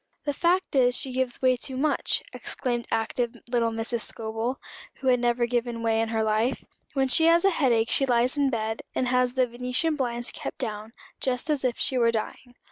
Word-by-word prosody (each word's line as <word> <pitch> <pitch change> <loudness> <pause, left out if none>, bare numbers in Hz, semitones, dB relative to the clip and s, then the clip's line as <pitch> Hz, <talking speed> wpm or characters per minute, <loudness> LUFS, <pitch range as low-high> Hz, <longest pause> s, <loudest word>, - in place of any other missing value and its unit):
"The 290 - 0
fact 350 +2 +1
is 250 -2 +4
she 265 - -6
gives 255 0 -2
way 255 0 +5
too 255 +1 -6
much," 300 +3 +1
exclaimed 240 -2 -2
active 235 +2 -1 0.2
little 235 -2 +2
Mrs. 225 +1 -1
Scobel, 225 +4 -3 0.4
who 265 - -6
had 250 -1 +4
never 240 0 +1
given 235 -1 -2
way 225 -1 +2
in 225 - -1
her 225 -1 0
life. 220 +4 0 0.3
"When 270 -2 +2
she 320 +5 +4
has 335 +2 +5
a 390 - +5
head 280 -7 +2
ache 225 0 +2
she 270 - +3
lies 245 +2 +2
in 285 -2 +2
bed, 220 -2 -2
and 255 - 0
has 250 0 +2
the 260 -1 +3
venetian 250 +6 -1
blinds 240 -3 -2
kept - - -6
down, 215 +1 -4 0.3
just 255 +4 -1
as 290 -3 0
if 250 -2 0
she 260 - 0
were 230 -1 +4
dying. 235 +2 -5
245 Hz, 210 wpm, -26 LUFS, 230-265 Hz, 0.4 s, way